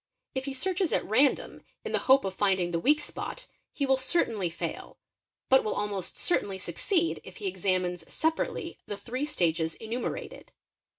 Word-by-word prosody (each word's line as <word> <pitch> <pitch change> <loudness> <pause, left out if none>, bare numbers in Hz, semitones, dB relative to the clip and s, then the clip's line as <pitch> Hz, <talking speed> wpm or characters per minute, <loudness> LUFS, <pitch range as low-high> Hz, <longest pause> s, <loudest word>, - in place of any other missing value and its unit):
| - - -59
If 265 -1 -2
he 275 - -3
searches 370 +4 +1
at - - +2
random 255 +7 +2 0.2
in - - -3
the - - +2
hope 265 -2 +7
of 190 - -2
finding 190 -3 +2
the 170 - 0
weak 295 - +4
spot, - - -6 0.3
he 280 - -1
will 265 -1 +4
certainly 245 - +1
fail; 165 - -5 0.5
but 265 0 +6
will 215 - -1
almost 205 -3 -3
certainly 200 - +1
succeed 335 - 0
if - - -11
he 415 - -7
examines 185 - -1
separately 320 +1 -1
the 205 - -4
three 250 +7 -3
stages 165 - +1
enumerated. 230 +3 -5
235 Hz, 170 wpm, -29 LUFS, 190-295 Hz, 0.5 s, hope